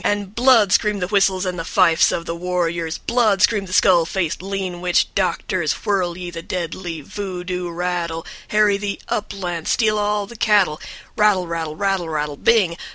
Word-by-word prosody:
And 205 -1 -1
"BLOOD" 235 -4 +4
screamed 210 -2 +2
the - - -1
whistles 195 -2 +2
and 180 -1 -3
the - - -3
fifes 170 -1 +3
of 170 - -3
the 165 - -3
warriors, 170 -2 -2
"BLOOD" 220 -5 +1
screamed 205 -4 +2
the - - -10
skull 180 -3 +5
faced, 175 -3 -2
lean 190 -2 -4
witch 180 -1 +1
doctors, 180 -3 0
"Whirl 185 -5 0
ye 180 -1 -6
the 165 -1 -6
deadly 170 -1 -5
voo 185 +3 -6
doo 180 -1 -4
rattle, 170 -1 -3 0.2
Harry 210 -1 +3
the 200 0 -4
uplands, 180 -6 -3
Steal 215 -3 +2
all 210 0 0
the 235 - -12
cattle, 205 -8 +2 0.3
Rattle 210 -4 +3
rattle, 165 -2 -4
rattle 195 -2 -1
rattle, 150 -2 -2
Bing. 185 -2 +2
185 Hz, 175 wpm, -20 LUFS, 170-205 Hz, 0.3 s, skull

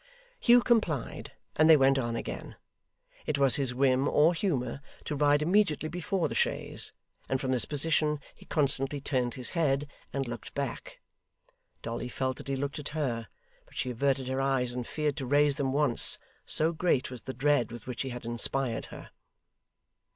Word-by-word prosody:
Hugh 240 0 +5
complied, 195 - -1 0.2
and 155 +1 +4
they 160 - +9
went 135 0 +3
on 120 -2 -2
again. - - -6 0.7
It 150 - 0
was 135 -2 +4
his 135 -3 -1
whim 130 +1 +2
or 155 +4 +4
humour 140 - -2 0.2
to 150 - -3
ride 145 +1 +3
immediately 165 -3 +1
before 180 +1 -2
the - - -6
chaise, - - -2 0.4
and 135 - 0
from 130 0 -2
this 125 -2 +2
position 150 0 +2
he - - -18
constantly 140 -1 0
turned 125 -4 -1
his 125 - -3
head, 145 -4 0 0.2
and 135 -2 -3
looked 120 0 -8
back. - - -5 0.8
Dolly 120 +1 -4
felt 130 0 -2
that - - -10
he 135 - -1
looked 140 +2 -4
at 145 - -5
her, 120 -7 -2 0.4
but - - -15
she 130 - -2
averted 135 +1 0
her 130 +1 -1
eyes 130 -2 0
and 125 -1 -5
feared 150 -1 -2
to 135 -4 -4
raise 145 +1 +3
them 135 -3 -1
once, 140 -3 +6 0.3
so 160 +2 +2
great 160 -6 0
was 125 -3 -7
the - - -6
dread 140 -3 +1
with 120 -1 -9
which 125 -2 -5
he 135 - -3
had 120 -1 -7
inspired 120 +1 0
her. - - -11
135 Hz, 180 wpm, -29 LUFS, 130-150 Hz, 0.8 s, they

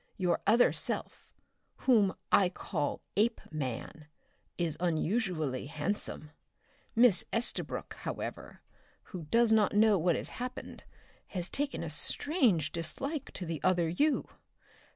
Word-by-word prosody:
Your 180 -2 +1
other 235 +4 +5
self, - - -3 0.6
whom 215 -7 +4 0.2
I 190 -3 +5
call 165 -4 -3
Apeman, 155 - -2 0.5
is 170 -3 -1
unusually 165 - -1
handsome. 155 0 -3 0.6
Miss 230 -5 +6
Estabrook, 230 +1 0
however, - - -6 0.5
who 175 -4 -6
does 230 +8 +3
not 215 -2 +3
know 210 -2 +5
what 170 0 +2
has - - -3
happened, 250 0 -7 0.4
has 180 -2 -2
taken 280 -9 -1
a 165 - -4
strange 190 - +1
dislike 270 - -4
to 180 - -5
the 165 -3 -4
other 180 -2 +2
you! 285 - +1
185 Hz, 115 wpm, -31 LUFS, 160-230 Hz, 0.6 s, Miss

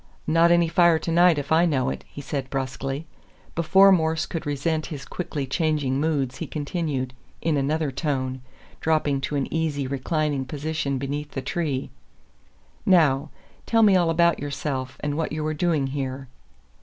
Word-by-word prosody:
"Not 165 +2 +4
any 170 -1 +4
fire 170 -1 +4
tonight 170 +1 +4
if 145 +1 -4
I 165 +2 +5
know 135 -4 +1
it," - - -6
he 145 - -9
said, 135 -1 -4
brusquely. 135 +2 -3 0.5
Before 190 +4 +5
Morse 160 -3 +2
could 165 -2 -5
resent 155 +2 -1
his 140 -3 -7
quickly 150 -3 -4
changing 145 -2 0
moods 140 -5 0
he 165 - -5
continued, 145 -4 -3 0.3
in 160 -2 0
another 145 +1 0
tone, 130 -2 -2 0.4
dropping 150 -3 +1
to 140 +2 -3
an 140 - 0
easy 155 -4 -1
reclining 140 +1 -1
position 145 0 -2
beneath 145 +2 -4
the 135 - -3
tree, 140 -2 -2 0.9
"Now, 155 -6 +4 0.4
tell 225 -1 +4
me 200 -3 +6
all 175 -2 +3
about 170 +1 +3
yourself, 140 -2 -4
and 145 -1 -2
what 160 - -1
you 155 0 -3
are 155 - -1
doing 155 -3 +1
here." 135 -1 -4
150 Hz, 160 wpm, -24 LUFS, 135-165 Hz, 0.9 s, me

